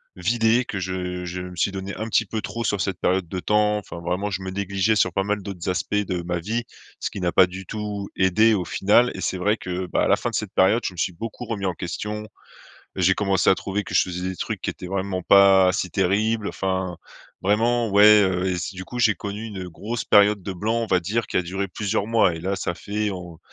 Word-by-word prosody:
vidé, 115 Hz, +5 st, +2 dB
que 110 Hz, -, -5 dB
je 90 Hz, -1 st, -3 dB
je 90 Hz, +1 st, -5 dB
me 90 Hz, 0 st, -8 dB
suis 90 Hz, +3 st, +1 dB
donné 95 Hz, 0 st, -5 dB
un 110 Hz, -, -4 dB
petit 115 Hz, -1 st, +1 dB
peu 110 Hz, -, -3 dB
trop 115 Hz, +3 st, -4 dB
sur 105 Hz, -2 st, 0 dB
cette 95 Hz, -1 st, -2 dB
période 95 Hz, -1 st, +1 dB
de 90 Hz, -, -4 dB
temps, 105 Hz, +2 st, +2 dB
enfin 90 Hz, -4 st, -9 dB
vraiment, 90 Hz, +4 st, -2 dB
je 95 Hz, -1 st, -4 dB
me 95 Hz, -, -4 dB
négligeais 100 Hz, +2 st, 0 dB
sur 95 Hz, -3 st, +2 dB
pas 95 Hz, -, 0 dB
mal 105 Hz, +1 st, -1 dB
d'autres 95 Hz, -2 st, -5 dB
aspects 90 Hz, -, -2 dB
de 95 Hz, -4 st, -1 dB
ma 90 Hz, 0 st, -2 dB
vie, 110 Hz, +8 st, -2 dB, 0.4 s
ce -, -, -2 dB
qui -, -, -7 dB
n'a 90 Hz, -2 st, 0 dB
pas 95 Hz, -2 st, +6 dB
du 95 Hz, +1 st, -8 dB
tout 105 Hz, -1 st, -5 dB
aidé 110 Hz, +4 st, +4 dB
au 95 Hz, -, 0 dB
final, 105 Hz, +8 st, +3 dB
et -, -, -6 dB
c'est 95 Hz, -, -2 dB
vrai 105 Hz, +4 st, +1 dB
que, 90 Hz, -1 st, -4 dB
bah, -, -, 0 dB
à -, -, +2 dB
la -, -, +5 dB
fin -, -, -3 dB
de -, -, -5 dB
cette -, -, -3 dB
période, 100 Hz, +6 st, +3 dB
je 95 Hz, -, -2 dB
me -, -, -16 dB
suis 90 Hz, -, -1 dB
beaucoup 115 Hz, +6 st, -7 dB
remis 105 Hz, -4 st, -3 dB
en 90 Hz, -, 0 dB
question. 105 Hz, +5 st, -5 dB, 0.7 s
J’ai 95 Hz, +1 st, +3 dB
commencé 100 Hz, -3 st, +2 dB
à 95 Hz, -, +5 dB
trouver 100 Hz, +1 st, -3 dB
que -, -, -8 dB
je -, -, +5 dB
faisais 90 Hz, 0 st, -4 dB
des 95 Hz, -, -6 dB
trucs -, -, -4 dB
qui -, -, -2 dB
étaient 90 Hz, -, -7 dB
vraiment 95 Hz, -1 st, -2 dB
pas 95 Hz, -1 st, +6 dB
si 90 Hz, -, -2 dB
terribles. 105 Hz, +4 st, +1 dB
Enfin, 95 Hz, -2 st, -2 dB, 0.5 s
vraiment 115 Hz, +4 st, +2 dB
ouais, 105 Hz, +1 st, +7 dB
heu, 95 Hz, -1 st, 0 dB
et 95 Hz, -, 0 dB
s 90 Hz, +2 st, -4 dB
du 95 Hz, 0 st, -7 dB
coup, 125 Hz, -, -7 dB
j'ai 110 Hz, -4 st, +3 dB
connu 105 Hz, +2 st, -6 dB
une 95 Hz, -4 st, -6 dB
grosse 105 Hz, +5 st, -5 dB
période 105 Hz, 0 st, +5 dB
de 95 Hz, +1 st, -5 dB
blanc, 105 Hz, +6 st, -1 dB
on 115 Hz, 0 st, 0 dB
va 90 Hz, -1 st, +2 dB
dire, 110 Hz, +7 st, -1 dB
qui -, -, -8 dB
a -, -, +4 dB
duré 95 Hz, +3 st, -3 dB
plusieurs 100 Hz, +2 st, -2 dB
mois, 115 Hz, -6 st, +3 dB
et 80 Hz, -, -6 dB
là 95 Hz, +4 st, -2 dB
ça 90 Hz, -, -2 dB
fait 105 Hz, +3 st, -2 dB
en 90 Hz, -3 st, -8 dB
95 Hz, 250 wpm, -23 LUFS, 90-105 Hz, 0.7 s, ouais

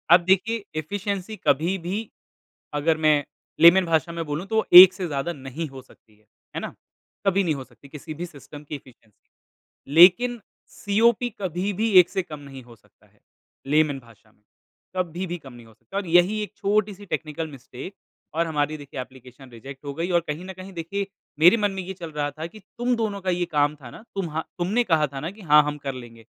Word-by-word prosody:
अब 175 Hz, +2 st, +8 dB
देखिए 200 Hz, +4 st, +2 dB, 0.2 s
एफिशिएंसी 200 Hz, +4 st, -4 dB
कभी 160 Hz, +7 st, +2 dB
भी 190 Hz, +5 st, -4 dB, 0.6 s
अगर 155 Hz, +2 st, +1 dB
मैं 150 Hz, -1 st, +4 dB, 0.4 s
लेमन 180 Hz, +2 st, +8 dB
भाषा 165 Hz, -1 st, +1 dB
में 170 Hz, 0 st, -4 dB
बोलूँ 150 Hz, +4 st, -4 dB
तो 220 Hz, -, -3 dB
वो 220 Hz, -, +2 dB, 0.2 s
एक 185 Hz, 0 st, +8 dB
से 185 Hz, -1 st, -4 dB
ज़्यादा 145 Hz, +2 st, -3 dB
नहीं 140 Hz, +3 st, -6 dB
हो 135 Hz, -1 st, -10 dB
सकती 110 Hz, -4 st, -24 dB
है। 105 Hz, -, -31 dB, 0.3 s
है -, -, -1 dB
ना? -, -, -6 dB, 0.5 s
कभी 195 Hz, +1 st, +3 dB
नहीं 160 Hz, -4 st, 0 dB
हो 135 Hz, -, -6 dB
सकती 130 Hz, +2 st, -19 dB
किसी 150 Hz, +2 st, -8 dB
भी 170 Hz, +3 st, -5 dB
सिस्टम 145 Hz, -2 st, -12 dB
की 150 Hz, -, -7 dB
एफिशिएंसी 120 Hz, -6 st, -17 dB, 0.6 s
लेकिन 195 Hz, +9 st, +6 dB, 0.4 s
सीओपी 230 Hz, +4 st, +2 dB
कभी 185 Hz, +2 st, -2 dB
भी 220 Hz, +3 st, 0 dB
एक 175 Hz, -1 st, +5 dB
से 190 Hz, +1 st, -1 dB
कम 150 Hz, -3 st, -9 dB
नहीं 135 Hz, -2 st, -11 dB
हो 120 Hz, -1 st, -16 dB
सकता 110 Hz, -, -29 dB
है, -, -, -33 dB, 0.5 s
लेमन 150 Hz, -1 st, +2 dB
भाषा 115 Hz, -3 st, -21 dB
में, 105 Hz, -, -35 dB, 0.6 s
कभी 180 Hz, +1 st, -2 dB
भी 175 Hz, +1 st, -4 dB
कम 135 Hz, -6 st, -13 dB
नहीं 120 Hz, -1 st, -13 dB
हो 115 Hz, -, -18 dB
सकता 115 Hz, -, -9 dB
है -, -, +1 dB
और -, -, -10 dB
यही 175 Hz, +5 st, +4 dB
एक 210 Hz, -, -8 dB
छोटी-सी 205 Hz, 0 st, 0 dB
टेक्निकल 160 Hz, -3 st, -4 dB
मिस्टेक 135 Hz, +4 st, -10 dB, 0.4 s
और 165 Hz, +1 st, +1 dB
हमारी 155 Hz, -1 st, -1 dB
देखिए 140 Hz, -2 st, -7 dB
एप्लीकेशन 130 Hz, +1 st, -13 dB
रिजेक्ट 135 Hz, +4 st, -11 dB
हो 140 Hz, -, -4 dB
गई 165 Hz, +5 st, -3 dB
और 175 Hz, -, +4 dB
कहीं 155 Hz, +4 st, -4 dB
न 190 Hz, -, -7 dB
कहीं 190 Hz, +1 st, -11 dB
देखिए 190 Hz, +4 st, -4 dB, 0.3 s
मेरे 175 Hz, +8 st, +7 dB
मन 205 Hz, -2 st, +1 dB
में 195 Hz, 0 st, -4 dB
ये 190 Hz, +2 st, -6 dB
चल 170 Hz, -3 st, -8 dB
रहा 145 Hz, -1 st, -2 dB
था 155 Hz, +2 st, -7 dB
कि 215 Hz, +5 st, -14 dB, 0.2 s
तुम 245 Hz, +1 st, +1 dB
दोनों 215 Hz, -3 st, -2 dB
का 185 Hz, -, -2 dB
ये 175 Hz, 0 st, 0 dB
काम 145 Hz, 0 st, +2 dB
था 135 Hz, -5 st, -12 dB
ना -, -, -12 dB
तुमहा 165 Hz, -5 st, -2 dB, 0.2 s
तुमने 200 Hz, +8 st, +1 dB
कहा 160 Hz, -7 st, +2 dB
था 135 Hz, 0 st, -7 dB
ना 160 Hz, +5 st, -4 dB
कि 210 Hz, +2 st, -15 dB
हाँ, 150 Hz, -4 st, +6 dB
हम 150 Hz, 0 st, -3 dB
कर 140 Hz, -2 st, -5 dB
लेंगे 115 Hz, -3 st, -11 dB
165 Hz, 215 wpm, -24 LUFS, 145-190 Hz, 0.6 s, अब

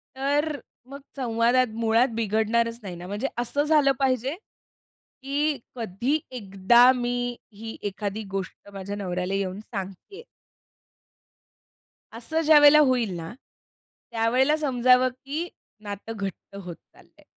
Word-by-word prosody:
तर 285 Hz, +2 st, 0 dB, 0.3 s
मग 275 Hz, +2 st, -10 dB, 0.2 s
संवादात 240 Hz, 0 st, +2 dB
मुळात 230 Hz, +2 st, +3 dB
बिघडणारच 230 Hz, +2 st, 0 dB
नाही 185 Hz, -3 st, -6 dB
ना. 175 Hz, +1 st, -9 dB
म्हणजे 210 Hz, +7 st, -2 dB
असं 245 Hz, +4 st, 0 dB
झालं 300 Hz, -2 st, +4 dB
पाहिजे, 265 Hz, +1 st, 0 dB, 0.9 s
की 285 Hz, 0 st, 0 dB, 0.2 s
कधी 235 Hz, +6 st, -1 dB
एकदा 235 Hz, +2 st, +4 dB
मी 245 Hz, 0 st, -2 dB, 0.2 s
ही 225 Hz, +2 st, -8 dB
एखादी 205 Hz, +2 st, -4 dB
गोष्ट 195 Hz, +1 st, -6 dB
माझ्या 200 Hz, +1 st, -5 dB
नवऱ्याला 180 Hz, -1 st, -3 dB
येऊन 195 Hz, 0 st, -2 dB
सांगते 195 Hz, -, -8 dB
आहे. 465 Hz, -, -10 dB, 2.0 s
असं 315 Hz, +7 st, -2 dB
ज्यावेळेला 300 Hz, -1 st, +7 dB
होईल 250 Hz, -5 st, +1 dB
ना, 165 Hz, +4 st, -7 dB, 0.8 s
त्यावेळेला 250 Hz, +6 st, +2 dB
समजावं, 255 Hz, -3 st, +3 dB
की 280 Hz, +7 st, -5 dB, 0.3 s
नातं 205 Hz, +2 st, -6 dB
घट्ट 195 Hz, 0 st, -6 dB
होत 175 Hz, -1 st, -6 dB
चाललंय. -, -, -24 dB
235 Hz, 115 wpm, -25 LUFS, 205-270 Hz, 2.0 s, ज्यावेळेला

